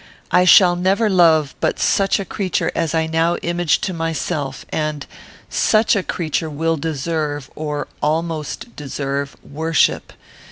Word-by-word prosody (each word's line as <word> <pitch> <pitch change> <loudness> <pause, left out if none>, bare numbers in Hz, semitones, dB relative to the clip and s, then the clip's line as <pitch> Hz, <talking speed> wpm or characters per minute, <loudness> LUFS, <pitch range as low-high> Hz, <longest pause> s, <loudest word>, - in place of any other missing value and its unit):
I 180 0 +4
shall 180 0 +7
never 195 +5 +1
love 160 -6 +4
but - - 0
such 195 0 +2
a 195 - -3
creature 190 -3 -1
as 165 -1 -1
I 160 0 +2
now 165 +2 +1
image 175 -1 +1
to 185 - -2
myself, 160 -4 -3
and 155 -1 -3 0.4
such 220 +1 +2
a 200 - +1
creature 160 -3 -2
will 165 +2 0
deserve, 150 -1 -3
or 150 -1 -4
almost 160 - -2
deserve, 140 0 -4
worship. 160 +2 0
160 Hz, 135 wpm, -19 LUFS, 150-175 Hz, 0.4 s, shall